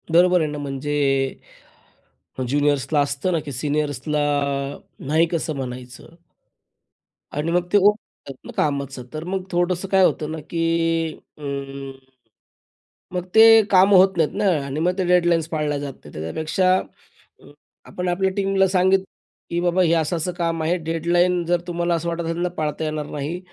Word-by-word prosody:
बरोबर 180 +1 +4
आहे 155 - 0
ना. 150 - -5
म्हणजे 145 0 -4 1.5
अ, - - -1
ज्युनियर्सला 145 +1 +1
असतं 145 +5 -1
ना, 170 - +2
की 145 -1 -8
सीनियर्सला 145 +1 -2 0.9
नाही 160 +3 +3
कसं 165 -2 -2
म्हणायचं? 125 -1 -7 1.3
आणि 155 +3 -1
मग 175 0 +1
ते - - +7
हो 205 +1 +6
म्हणतात 140 - -14
ना, - - -8
कामाचं 140 -3 -1
तर 155 0 -5
मग 185 +2 -3
थोडंसं 175 +1 0
काय 190 -1 +4
होतं 155 -3 -1
ना 160 - -4
की 165 -1 0 0.2
अं, 140 -1 -6 1.2
मग 180 -1 -2
ते 225 0 +8
काम 195 +1 +6
होत 190 0 +5
नाहीत 160 -2 +1
ना - - +1 0.2
आणि 140 +2 -4
मग 180 +3 0
ते 190 - 0
डेडलाईन्स 175 -2 +3
पाळल्या 150 -2 -1
जात 140 -1 -5
नाहीत. 75 - -16
त्याच्यापेक्षा 155 - 0 1.1
आपण 180 0 -5
आपल्या 190 +2 +1
टीमला 195 -1 +2
सांगितलं 190 +1 +2 0.4
की 170 - -1
बाबा 175 +1 +2
हे 165 -1 +3
असं 165 +1 +1
असं 165 +3 -2
काम 165 -2 -2
आहे. 170 +3 +1
डेडलाईन 175 +2 +1
जर 175 0 +1
तुम्हाला 175 0 0
असं 170 +1 -2
वाटत 170 0 -3
असेल 165 0 -3
ना, 180 - 0
पाळता 155 -3 -3
येणार 155 -1 -3
नाही 150 +5 -4
165 Hz, 160 wpm, -22 LUFS, 150-180 Hz, 1.5 s, ते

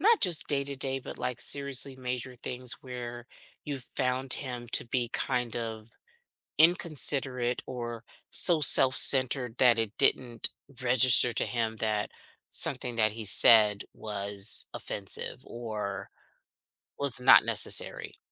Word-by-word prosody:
not 450 +2 0
just 175 -5 -2
day 140 -1 -4
to 140 -1 -10
day, 135 0 -6
but, - - -13
like, 125 -1 -8
seriously 140 -1 -4
major 125 0 -8
things 125 +1 -6
where 120 -1 -12 0.4
you 145 -2 -8 0.2
found 130 0 -4
him 125 -3 -8
to - - +1
be 120 0 -5
kind 125 -2 -6
of 110 -1 -9 0.7
inconsiderate 135 -7 +2
or 120 -2 -10 0.3
so 170 -4 +6
self-centered 130 -2 +7
that 120 -3 +1
it 110 -2 -5
didn't 120 -4 -3 0.3
register 125 -1 +3
to - - -5
him 115 -2 -6
that 105 -1 -6 0.4
something 120 - -1
that 110 -2 -2
he 110 0 -11
said 105 0 +5
was 100 -1 -2
offensive 95 -2 -8
or 110 -4 -10 0.9
was 140 -4 -6
not 125 - +3
necessary? - - -2
125 Hz, 130 wpm, -25 LUFS, 115-135 Hz, 0.9 s, self-centered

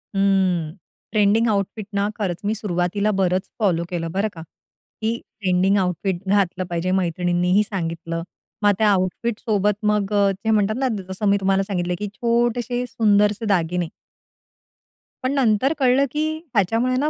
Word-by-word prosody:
हं, 190 -5 +1 0.4
trending 215 +2 +3
outfit 200 0 -2
ना, 200 +1 +1
खरंच 185 -5 -2
मी 210 - +1
सुरुवातीला 200 0 0
बरंच 185 0 +1
फॉलो 180 -6 +2
केलं, 165 -2 -3
बरं 200 +4 0
का. 165 - -9 0.6
की 225 +1 0 0.2
ट्रेंडिंग 190 +1 +2
आउटफिट 180 -1 -1
घातलं 190 -2 +1
पाहिजे, 175 +1 -2
मैत्रिणींनीही 180 +1 +1
सांगितलं. 165 -4 -4 0.4
मग 205 - +6
त्या 215 0 +3
आउटफिट 200 +4 -1
सोबत 210 -3 +1 0.2
मग 210 -1 -1
अ, 200 -1 +4
जे 200 +4 -2
म्हणतात 215 0 +2
ना, 265 0 +1 0.2
जसं 190 +3 -3
मी 200 - +4
तुम्हाला 195 0 +2
सांगितलं, 180 -3 -2
की 210 - -3
छोटेसे 240 +2 0
सुंदरसे 210 -1 +2
दागिने. 180 -3 0 1.4
पण 260 +2 0
नंतर 260 +1 +2
कळलं, 265 +1 +4
की 305 +1 0 0.3
ह्याच्यामुळे 225 +5 +2
ना 295 +3 +1
200 Hz, 145 wpm, -22 LUFS, 180-220 Hz, 1.4 s, मग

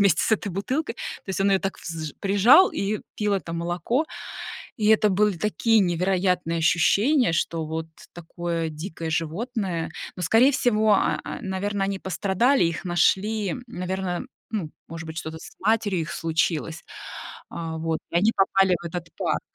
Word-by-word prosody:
вместе 195 -5 +4
с - - +1
этой 215 - +1
бутылкой. 255 - -2
То - - -8
есть 190 - -2
он 195 +1 +3
её 195 - +4
так 195 - -3
взж 160 -3 -5
прижал 205 - +6
и 205 +2 -1 0.2
пил 210 -1 +1
это 180 -3 -3
молоко. 175 - -1 0.7
И 215 -2 +1
это 215 -1 +5
были 200 -2 +2
такие 220 +2 +2
невероятные 180 -1 +1
ощущения, 205 - +3
что 165 0 -1
вот 160 +1 -3 0.3
такое 170 -1 -3
дикое 160 +1 -6
животное. 170 - -2 0.3
Но 180 - -5
скорее 225 +10 +5
всего, 220 -4 +3
а - - +1
а, - - -5
наверно, 195 +1 -1
они 195 0 -2
пострадали, 200 +7 +2
их 165 +1 -2
нашли, 190 +3 +1
наверно, 185 0 -3 0.2
ну, 195 -9 -3 0.2
может 165 0 -7
быть, 160 0 -8
что-то 160 0 -5
с - - -12
матерью 205 -3 +1
их 155 - -6
случилось. 165 -1 -1 0.7
Э, 165 -1 -4
вот, 160 0 -1
и - - -1
они 210 +6 +4
попали 195 -1 +4
в - - -5
этот 170 0 -5
парк. - - 0
190 Hz, 165 wpm, -25 LUFS, 165-210 Hz, 0.7 s, прижал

